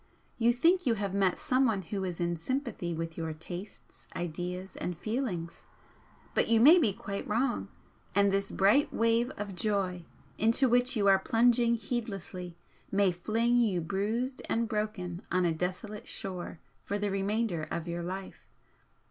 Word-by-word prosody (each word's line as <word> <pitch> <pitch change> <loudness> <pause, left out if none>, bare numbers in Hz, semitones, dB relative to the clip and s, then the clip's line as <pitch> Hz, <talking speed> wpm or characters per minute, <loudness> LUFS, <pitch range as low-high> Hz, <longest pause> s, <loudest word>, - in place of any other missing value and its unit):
You 235 +1 +5
think 335 +7 +3
you 230 - +3
have 200 -2 -3
met 195 -2 +2
someone 250 -7 +1
who 195 +3 -4
is 180 -3 -4
in 170 0 0
sympathy 225 - -3
with 165 0 -4
your 160 -1 -3
tastes, 175 +5 -10
ideas 180 +2 -4
and 180 -2 -4
feelings, 215 - -3 0.7
but - - +2
you 230 -1 +4
may 310 +10 +8
be 235 -11 +3
quite 200 -1 -5
wrong, 240 +4 0 0.5
and 200 0 +4
this 195 0 0
bright 210 +10 +3
wave 230 +1 +2
of 205 -1 -5
joy 190 -3 -1 0.4
into 230 +5 +4
which 245 +1 +3
you 205 - +1
are 195 -1 +6
plunging 235 0 +3
heedlessly 195 -6 -5 0.3
may 195 -1 +3
fling 225 +7 +1
you 215 -7 +2
bruised 215 +9 -2
and 230 0 +1
broken 210 -5 -3
on 185 +1 +2
a 170 - +2
desolate 185 +5 -4
shore 180 -3 -4 0.2
for 205 - -2
the 205 -1 -1
remainder 195 -4 -1
of 170 0 -4
your 170 0 -3
life. 185 +2 -7
200 Hz, 155 wpm, -30 LUFS, 180-230 Hz, 0.7 s, may